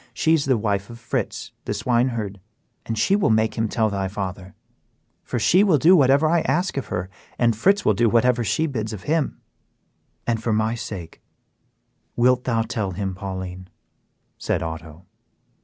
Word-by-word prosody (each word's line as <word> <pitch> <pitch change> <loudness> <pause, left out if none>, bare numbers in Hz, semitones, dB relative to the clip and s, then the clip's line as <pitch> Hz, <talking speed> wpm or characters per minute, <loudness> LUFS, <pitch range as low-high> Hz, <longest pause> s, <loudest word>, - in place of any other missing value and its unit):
She 160 - +2
is 155 -3 +2
the 130 -3 +2
wife 100 -2 -1
of 120 - -9
Fritz, 115 0 -4
the - - -2
swineherd, 115 -5 0 0.5
and 115 - -2
she 190 - +3
will 205 - +2
make 110 0 +2
him 110 -1 -1
tell 110 -2 +1
thy 100 -1 -1
father; 95 -1 -6 0.7
for - - -3
she 180 - +4
will 185 -7 +4
do 170 +6 +6
whatever 140 0 +4
I 170 +1 +3
ask 185 +2 0
of 140 - -3
her, 90 +1 -3 0.3
and 115 -2 +2
Fritz 195 - +2
will - - +4
do 120 -1 +2
whatever 120 +2 +3
she 155 +8 +1
bids 110 -7 -3
him 145 - 0
do." - - -21 0.9
"And 115 -2 0
for 115 -1 0
my 110 +1 +1
sake, 95 -8 -7 0.9
wilt 125 +1 +3
thou 115 -3 +1
tell 105 -4 -3
him, 95 +1 -3
Pauline?" 95 -1 -6 0.7
said - - -1
Otto. 80 +1 -7
115 Hz, 175 wpm, -23 LUFS, 100-130 Hz, 0.9 s, do